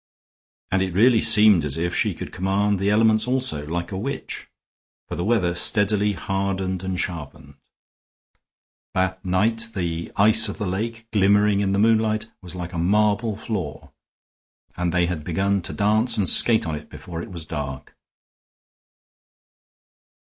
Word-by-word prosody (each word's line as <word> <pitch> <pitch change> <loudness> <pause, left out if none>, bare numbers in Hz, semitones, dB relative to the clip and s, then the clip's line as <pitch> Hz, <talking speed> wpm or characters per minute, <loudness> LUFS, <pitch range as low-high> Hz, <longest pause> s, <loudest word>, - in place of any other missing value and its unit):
And 95 - +2
it 95 -2 -2
really 115 +3 +5
seemed 105 -6 +5
as 75 -1 -3
if 85 +1 -2
she - - 0
could - - -7
command 95 +2 0
the 100 +1 +1
elements 110 +2 +3
also, 125 - -1
like 85 +3 -4
a 95 - -4
witch. 135 +6 -6 0.6
For - - -5
the 85 - -3
weather 100 -5 +1
steadily 105 +3 +2
hardened 95 0 -3
and 95 -1 -3
sharpened; 75 -4 -6 1.4
that 95 0 -1
night 110 +5 +1
the 85 -3 -3
ice 110 +2 +5
of - - -6
the 105 - -3
lake, 110 +5 -4
glimmering 105 0 +3
in 100 -1 0
the 100 - +1
moonlight, 110 0 +1
was 90 -1 -8
like 90 0 -6
a 85 - -3
marble 105 +4 +1
floor, 100 - -5 0.8
and 90 -1 -1
they 90 0 +2
had 85 -3 -4
begun 95 +4 0
to - - -5
dance 110 +3 +1
and 100 -3 +1
skate 115 -6 +3
on 80 - -3
it 75 - -7
before 85 -2 -8
it - - -8
was 85 -3 -7
dark. 70 -4 -6
95 Hz, 155 wpm, -23 LUFS, 90-110 Hz, 1.4 s, really